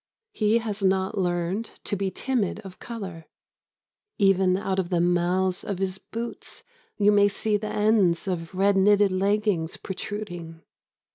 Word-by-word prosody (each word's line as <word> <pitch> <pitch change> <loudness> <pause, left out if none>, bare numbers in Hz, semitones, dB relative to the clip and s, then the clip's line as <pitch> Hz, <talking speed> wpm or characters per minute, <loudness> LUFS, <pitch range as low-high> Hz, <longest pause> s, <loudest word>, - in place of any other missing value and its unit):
He 215 - +2
has 215 -3 -3
not 190 +1 +1
learned 175 +4 -1 0.2
to - - -2
be 195 0 -1
timid 230 -2 -1
of 190 -3 -11
colour. 190 -9 -7 0.9
Even 190 -2 +3
out 190 -1 -1
of 180 -2 -1
the 175 -2 +1
mouths 180 +2 +1
of 200 - -3
his 190 0 -2
boots 230 +1 -7 0.3
you 205 0 +4
may 205 0 +5
see 210 +1 -1
the 210 +1 -2
ends 210 -4 +2
of 175 -1 -3
red 200 +1 +3
knitted 205 +1 +4
leggings 195 -3 0
protruding. 175 -5 -6
195 Hz, 145 wpm, -25 LUFS, 180-210 Hz, 0.9 s, may